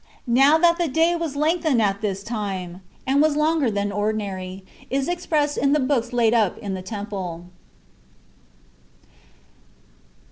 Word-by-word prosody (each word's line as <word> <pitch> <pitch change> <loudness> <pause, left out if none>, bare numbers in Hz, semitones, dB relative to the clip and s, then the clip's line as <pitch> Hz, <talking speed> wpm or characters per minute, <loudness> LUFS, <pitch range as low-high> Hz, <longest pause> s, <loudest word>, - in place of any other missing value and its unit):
Now, 270 +5 +5
that 340 +1 +3
the 345 - +1
day 325 +4 +2
was 330 -4 -3
lengthened 310 -2 +1
at 200 -2 +1
this 200 -2 -3
thee, 235 - -6 0.7
and 275 +2 +3
was 305 -1 +3
longer 305 -3 +2
than 205 -1 -1
ordinary, 195 -2 -3 0.2
is 270 0 -1
expressed 310 -4 0
in 280 0 +2
the 300 - +3
books 255 -3 0
laid 235 -2 +2
up 215 -6 +2
in 200 -2 -5
the 185 - -4
temple. 190 -4 -6
245 Hz, 140 wpm, -23 LUFS, 205-300 Hz, 0.7 s, Now